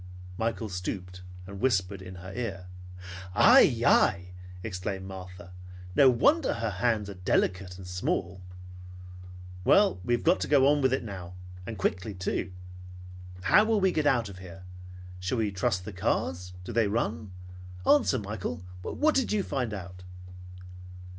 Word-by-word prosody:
Michael 115 Hz, +2 st, -2 dB
stooped 90 Hz, -1 st, -5 dB, 0.2 s
and 100 Hz, +1 st, -9 dB
whispered 100 Hz, -5 st, 0 dB
in 95 Hz, 0 st, -9 dB
her 95 Hz, +2 st, -9 dB
ear. 100 Hz, -6 st, -4 dB, 0.7 s
"Ai! -, -, +6 dB
Ai!" 90 Hz, +1 st, +3 dB, 0.3 s
exclaimed 95 Hz, -2 st, -4 dB
Martha. 90 Hz, -1 st, -10 dB, 0.4 s
"No 135 Hz, -, +7 dB
wonder 285 Hz, -, +3 dB
her 115 Hz, -2 st, -2 dB
hands 105 Hz, +1 st, 0 dB
are 100 Hz, -, -6 dB
delicate 90 Hz, 0 st, -1 dB
and 95 Hz, -, -10 dB
small! 90 Hz, +1 st, -2 dB, 1.2 s
Well, 200 Hz, -, +4 dB
we 120 Hz, +6 st, +2 dB
have 120 Hz, -, -5 dB
got 175 Hz, +3 st, +3 dB
to -, -, -2 dB
go 140 Hz, -2 st, +5 dB
on 145 Hz, 0 st, +3 dB
with 130 Hz, -1 st, +3 dB
it 130 Hz, -, 0 dB
now. 90 Hz, -5 st, -8 dB, 0.3 s
And 110 Hz, -, -5 dB
quickly, 95 Hz, +2 st, -2 dB
too. 90 Hz, +1 st, -3 dB, 0.9 s
How 210 Hz, -, +6 dB
will 220 Hz, -1 st, +2 dB
we 190 Hz, -1 st, +3 dB
get 155 Hz, -3 st, 0 dB
out 120 Hz, -6 st, +2 dB
of 95 Hz, -2 st, -10 dB
here? 90 Hz, -1 st, -11 dB, 0.6 s
Shall 95 Hz, +7 st, -2 dB
we 110 Hz, -2 st, 0 dB
trust 95 Hz, -1 st, -1 dB
the 105 Hz, -, -7 dB
cars? 90 Hz, 0 st, -2 dB
Do -, -, -7 dB
they 115 Hz, -1 st, +3 dB
run? 110 Hz, -1 st, -2 dB, 0.5 s
Answer, 145 Hz, -2 st, +4 dB
Michael, 100 Hz, -5 st, -5 dB, 0.2 s
what 305 Hz, -, +1 dB
did 265 Hz, -3 st, +1 dB
you 210 Hz, -2 st, +1 dB
find 125 Hz, -9 st, -2 dB
out?" 95 Hz, -3 st, -8 dB
100 Hz, 155 wpm, -28 LUFS, 90-120 Hz, 1.2 s, No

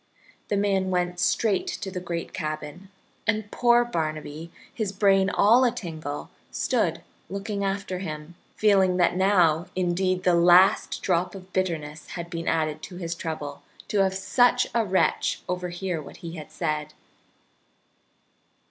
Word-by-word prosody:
The 205 Hz, -, 0 dB
man 195 Hz, -2 st, +1 dB
went 180 Hz, -1 st, -1 dB
straight 190 Hz, +2 st, +1 dB
to 190 Hz, -, -4 dB
the 185 Hz, -, -4 dB
great 170 Hz, -1 st, -5 dB
cabin, 155 Hz, +3 st, -5 dB, 0.4 s
and 215 Hz, -1 st, 0 dB
poor 240 Hz, 0 st, +4 dB
Barnaby, 155 Hz, -4 st, -4 dB, 0.2 s
his 215 Hz, -4 st, -2 dB
brain 195 Hz, -1 st, +3 dB
all 225 Hz, +6 st, +5 dB
atingle, 165 Hz, -, -3 dB, 0.2 s
stood -, -, 0 dB, 0.3 s
looking 200 Hz, +1 st, -3 dB
after 195 Hz, -1 st, -2 dB
him, 155 Hz, -2 st, -6 dB, 0.2 s
feeling 190 Hz, -4 st, +3 dB
that 175 Hz, -1 st, +3 dB
now 180 Hz, -3 st, +3 dB
indeed 185 Hz, 0 st, 0 dB
the 180 Hz, -, +4 dB
last 175 Hz, +2 st, +5 dB
drop 180 Hz, 0 st, 0 dB
of 185 Hz, -1 st, -12 dB
bitterness 160 Hz, -5 st, -2 dB
had 170 Hz, 0 st, -6 dB
been 165 Hz, -1 st, -4 dB
added 155 Hz, -2 st, 0 dB
to 180 Hz, -, -9 dB
his 170 Hz, -2 st, -4 dB
trouble 155 Hz, -4 st, -5 dB, 0.3 s
to 205 Hz, -, +1 dB
have 190 Hz, -1 st, +2 dB
such 245 Hz, +6 st, +3 dB
a 230 Hz, -, +2 dB
wretch 190 Hz, -2 st, +1 dB
overhear 180 Hz, -1 st, -3 dB
what 145 Hz, -, -11 dB
he 165 Hz, -, -5 dB
had 155 Hz, -3 st, -8 dB
said. 150 Hz, -2 st, -2 dB
180 Hz, 140 wpm, -26 LUFS, 165-195 Hz, 0.4 s, all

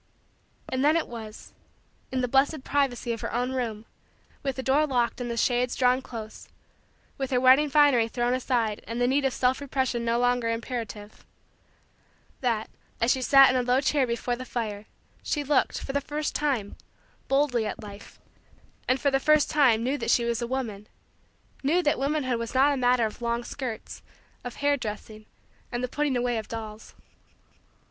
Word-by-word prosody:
And 260 Hz, +1 st, -1 dB
then 305 Hz, +3 st, +4 dB
it 335 Hz, -, -1 dB
was 220 Hz, -2 st, -9 dB, 0.6 s
in 260 Hz, -1 st, 0 dB
the 250 Hz, -, 0 dB
blessed 270 Hz, +3 st, +2 dB
privacy 260 Hz, -4 st, 0 dB
of 230 Hz, -, -6 dB
her -, -, -4 dB
own 245 Hz, +2 st, -1 dB
room, 230 Hz, -4 st, -3 dB, 0.6 s
with 270 Hz, -2 st, -2 dB
the 260 Hz, -, -5 dB
door 290 Hz, +4 st, +3 dB
locked 245 Hz, -2 st, 0 dB
and 240 Hz, -, -3 dB
the 235 Hz, -, -3 dB
shades 245 Hz, +1 st, +1 dB
drawn 250 Hz, 0 st, +3 dB
close, 220 Hz, -4 st, -9 dB, 0.7 s
with 270 Hz, -1 st, -2 dB
her 250 Hz, -, +2 dB
wedding 260 Hz, +4 st, +5 dB
finery 280 Hz, -5 st, +4 dB
thrown 240 Hz, +1 st, -1 dB
aside 240 Hz, -4 st, -1 dB
and 230 Hz, +1 st, -4 dB
the 245 Hz, -, +3 dB
need 270 Hz, +3 st, +2 dB
of 265 Hz, -, +1 dB
self 255 Hz, +2 st, +1 dB
repression 260 Hz, -3 st, -1 dB
no 235 Hz, 0 st, +1 dB
longer 245 Hz, -1 st, +1 dB
imperative 230 Hz, -3 st, -5 dB, 1.2 s
that, 230 Hz, -4 st, -1 dB, 0.3 s
as 230 Hz, +2 st, +3 dB
she 260 Hz, -, +1 dB
sat 270 Hz, +1 st, +7 dB
in -, -, -1 dB
a 255 Hz, -, +3 dB
low 250 Hz, +1 st, +2 dB
chair 275 Hz, -1 st, +1 dB
before 235 Hz, +1 st, -2 dB
the 255 Hz, -, -7 dB
fire, 215 Hz, -4 st, -4 dB, 0.3 s
she 295 Hz, -, -2 dB
looked, 285 Hz, -1 st, +1 dB
for 270 Hz, -, -6 dB
the 285 Hz, -, +1 dB
first 295 Hz, +2 st, -3 dB
time, 260 Hz, -9 st, -1 dB, 0.5 s
boldly 270 Hz, -5 st, +1 dB
at 215 Hz, -, -6 dB
Life 205 Hz, 0 st, -11 dB, 0.7 s
and, 255 Hz, +1 st, +2 dB
for 280 Hz, +2 st, +1 dB
the 270 Hz, -, +2 dB
first 305 Hz, +1 st, +3 dB
time, 260 Hz, -7 st, +4 dB
knew 270 Hz, +4 st, -1 dB
that -, -, -3 dB
she 235 Hz, -, +3 dB
was 235 Hz, 0 st, -1 dB
a 235 Hz, -, -2 dB
woman 225 Hz, -5 st, -4 dB, 0.7 s
knew 330 Hz, +6 st, +2 dB
that 295 Hz, -, +1 dB
womanhood 270 Hz, -3 st, 0 dB
was 230 Hz, +2 st, -5 dB
not 280 Hz, +3 st, +5 dB
a -, -, -1 dB
matter 250 Hz, -2 st, +3 dB
of 215 Hz, +2 st, -6 dB
long 235 Hz, 0 st, -1 dB
skirts, 240 Hz, -4 st, -6 dB, 0.4 s
of 245 Hz, -, -7 dB
hair 285 Hz, 0 st, +2 dB
dressing, 215 Hz, -2 st, -7 dB, 0.4 s
and 240 Hz, +1 st, -3 dB
the -, -, 0 dB
putting 285 Hz, 0 st, -1 dB
away 240 Hz, -1 st, 0 dB
of 215 Hz, -, -8 dB
dolls. 220 Hz, -1 st, -8 dB
250 Hz, 185 wpm, -26 LUFS, 235-270 Hz, 1.2 s, sat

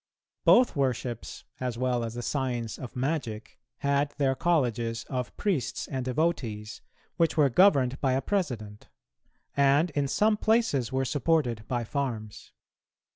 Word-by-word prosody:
Both 245 Hz, -5 st, +6 dB
worships, 125 Hz, -4 st, -2 dB, 0.2 s
as 125 Hz, -2 st, -3 dB
well 125 Hz, -1 st, 0 dB
as 115 Hz, 0 st, -5 dB
the 120 Hz, -, -4 dB
Science 125 Hz, -5 st, -2 dB
of 125 Hz, -, -8 dB
Magic, 125 Hz, -6 st, -3 dB, 0.2 s
had 140 Hz, +1 st, +1 dB
their 135 Hz, -2 st, +2 dB
colleges 120 Hz, -8 st, 0 dB
of 125 Hz, -2 st, -3 dB
priests 175 Hz, -, -1 dB
and 130 Hz, -3 st, -3 dB
devotees, 125 Hz, -6 st, -2 dB, 0.4 s
which 165 Hz, -2 st, +2 dB
were 145 Hz, -3 st, +5 dB
governed 135 Hz, -6 st, +4 dB
by 130 Hz, -2 st, +2 dB
a 135 Hz, -, +1 dB
president, 120 Hz, -, -3 dB, 0.7 s
and 140 Hz, +4 st, +3 dB
in 145 Hz, -1 st, 0 dB
some 210 Hz, +9 st, +2 dB
places 215 Hz, -, +1 dB
were 130 Hz, 0 st, 0 dB
supported 135 Hz, -6 st, 0 dB
by 120 Hz, -2 st, -1 dB
farms. 115 Hz, -4 st, -4 dB
130 Hz, 135 wpm, -28 LUFS, 120-150 Hz, 0.7 s, Both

